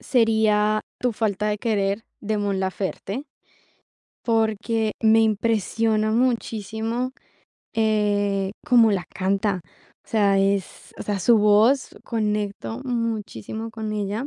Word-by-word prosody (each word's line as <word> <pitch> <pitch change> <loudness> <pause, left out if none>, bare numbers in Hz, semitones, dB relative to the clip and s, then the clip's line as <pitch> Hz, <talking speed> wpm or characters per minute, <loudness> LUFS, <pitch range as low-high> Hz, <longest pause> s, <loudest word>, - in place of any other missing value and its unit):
sería 215 -3 +2 0.2
Tu 245 -2 0
Falta 210 -1 -1
De 210 - -1
Querer, 205 -1 0 0.2
de 215 0 -1
Mon 200 -2 -1
Laferte. 195 +5 -3 1.0
Porque 225 -1 +1
me 220 0 +5
impresiona 220 0 +1
muchísimo, 230 0 -1 0.6
eh, 205 -3 +1
cómo 235 -3 +5
la 185 -3 -1
canta. 195 +1 0 0.4
O - - -28
sea, 200 -3 +3
es 195 -1 -1
o - - -4
sea, 205 -1 -2
su 225 +5 +4
voz, 215 +6 +4 0.2
conecto 210 0 -2
muchísimo 225 - -3
con 220 -1 -5
ella. 210 +4 -2
215 Hz, 115 wpm, -23 LUFS, 200-225 Hz, 1.0 s, me